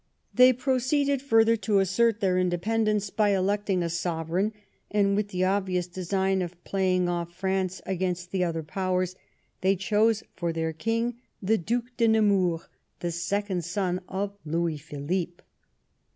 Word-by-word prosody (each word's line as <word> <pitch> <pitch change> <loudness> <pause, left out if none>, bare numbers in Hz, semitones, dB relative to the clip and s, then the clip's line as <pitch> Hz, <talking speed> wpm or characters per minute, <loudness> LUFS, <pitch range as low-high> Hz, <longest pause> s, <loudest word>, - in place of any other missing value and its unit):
They 255 +1 +7
proceeded 265 +2 +1
further 225 -4 +4
to 205 -1 +1
assert 205 +4 +2
their 185 -2 +2
independence 210 +3 0
by 205 -2 +2
electing 195 -1 0
a - - 0
sovereign, 170 +4 -1 0.4
and, 200 -1 +2
with 210 0 0
the 185 -2 -1
obvious 185 -2 0
design 190 +2 -1
of 175 0 -6
playing 185 -2 +1
off 170 -1 -2
France 190 0 -1
against 180 -1 -2
the 190 -2 +1
other 165 -2 -2
Powers, 185 +2 -1 0.5
they 190 +1 +3
chose 215 +3 +2
for 170 -2 -1
their 160 0 -2
King 230 +7 -1 0.2
the 220 +3 +1
Due 235 +8 -1
de 230 -2 +3
Nemours, 200 -6 +3 0.4
the 175 - -1
second 180 +2 -1
son 180 +1 -1
of 200 +1 -3
Louis 165 0 -1
Philippe. 165 +4 -4
190 Hz, 145 wpm, -27 LUFS, 175-210 Hz, 0.5 s, They